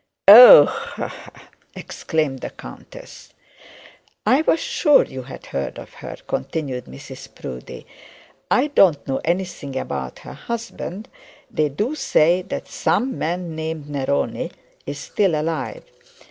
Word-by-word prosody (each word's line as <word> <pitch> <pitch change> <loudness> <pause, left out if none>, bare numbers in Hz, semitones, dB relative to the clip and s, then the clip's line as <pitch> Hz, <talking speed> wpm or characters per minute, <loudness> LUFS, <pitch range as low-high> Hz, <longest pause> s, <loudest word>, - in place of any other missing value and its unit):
'Oh 245 - +12
h 465 +1 -5
h - - -4
h!' - - -16 0.3
exclaimed 155 -5 -3
the - - -6
countess. - - -13 0.9
'I 270 +4 +4
was 325 - +3
sure 470 - +3
you 130 0 -8
had 130 +1 -11
heard 70 - -4
of - - -11
her,' - - -9
continued 130 - -4
Mrs 65 0 -12
Proudie. 65 -1 -9 0.6
'I 255 +4 +3
don't 175 - +3
know 135 -1 -2
anything 170 -6 -3
about 65 - -5
her - - -8
husband. 225 -3 -6 0.4
They 155 -1 0
do 210 - -2
say 175 - +2
that 190 - -6
some 260 +1 -1
man 170 0 -3
named 160 -2 -5
Neroni 130 - -2 0.4
is 145 0 -5
still 170 +1 0
alive. 150 -7 -4
160 Hz, 135 wpm, -21 LUFS, 135-220 Hz, 0.9 s, Oh